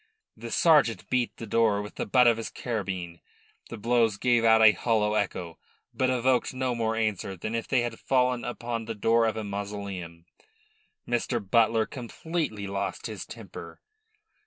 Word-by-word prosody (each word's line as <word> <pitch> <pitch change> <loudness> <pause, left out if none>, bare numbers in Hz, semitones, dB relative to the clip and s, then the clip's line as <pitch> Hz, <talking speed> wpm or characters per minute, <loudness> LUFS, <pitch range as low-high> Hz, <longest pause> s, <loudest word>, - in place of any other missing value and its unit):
The - - -8
sergeant 150 - +3
beat 125 -2 0
the 115 - -6
door 110 -1 +2
with 105 - -9
the - - -4
butt 125 +4 +5
of 115 -1 +5
his 115 - -4
carbine. 95 -7 -4 0.5
The 115 - -7
blows 115 -1 +2
gave 120 +1 +2
out 115 0 +6
a 110 - +9
hollow 105 +1 +1
echo, 85 -5 -2 0.3
but 130 - +1
evoked 130 0 +1
no 130 -1 -1
more 115 -1 -1
answer 105 -4 -2
than 110 +6 -5
if 115 -1 -2
they 130 -3 +2
had 120 0 -4
fallen 125 -2 +1
upon 120 -1 -4
the 115 0 -5
door 115 +2 +3
of 110 - -2
a 110 - -3
mausoleum. 100 -4 -6 0.8
Mr. 120 0 0
Butler 110 +2 +2
completely 130 -3 -4
lost 100 -1 -4
his - - -6
temper. - - -10
115 Hz, 165 wpm, -27 LUFS, 100-120 Hz, 0.8 s, a